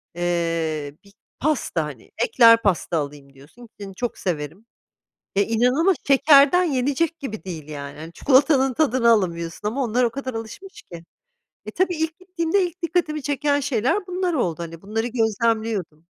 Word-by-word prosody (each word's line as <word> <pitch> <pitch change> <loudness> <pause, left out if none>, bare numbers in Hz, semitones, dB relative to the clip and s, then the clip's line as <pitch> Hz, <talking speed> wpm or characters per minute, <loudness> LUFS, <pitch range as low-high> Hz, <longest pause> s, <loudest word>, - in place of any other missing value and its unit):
eee, 165 -4 -2
bir 200 0 -20 0.3
pasta, 305 +1 0
hani, - - -10
ekler 230 - +6
pasta 180 -4 0
alayım 140 -2 -6
diyorsun 150 - -16
ki, 200 -1 -7
çok 245 -1 -3
severim 165 +3 -4 0.7
ya, 200 - +4
inanılmaz 250 - +2
şekerden 285 +5 +6
yenecek 290 +3 0
gibi 220 -7 -6
değil, 160 -5 -7
yani, 145 -1 -8
hani, 165 +2 -9
çikolatanın 270 -1 +3
tadını 255 -5 +2
alamıyorsun 175 -2 -1
ama 265 +6 -1
onlar 245 +1 +1
o 235 - +3
kadar 260 +1 -6
alışmış 375 - -8
ki. 170 -1 -11 0.6
Eee, 215 - -6
tabii, 365 -1 +1
ilk 320 +2 -3
gittiğimde 365 0 -1
ilk 355 +2 -14
dikkatimi 330 -3 -1
çeken 285 +1 0
şeyler 280 - 0
bunlar 365 -1 -1
oldu, 175 - -1
hani, 165 0 -9
bunları 225 +3 -2
gözlemliyordum. 220 -7 -1
230 Hz, 150 wpm, -22 LUFS, -, 0.7 s, ekler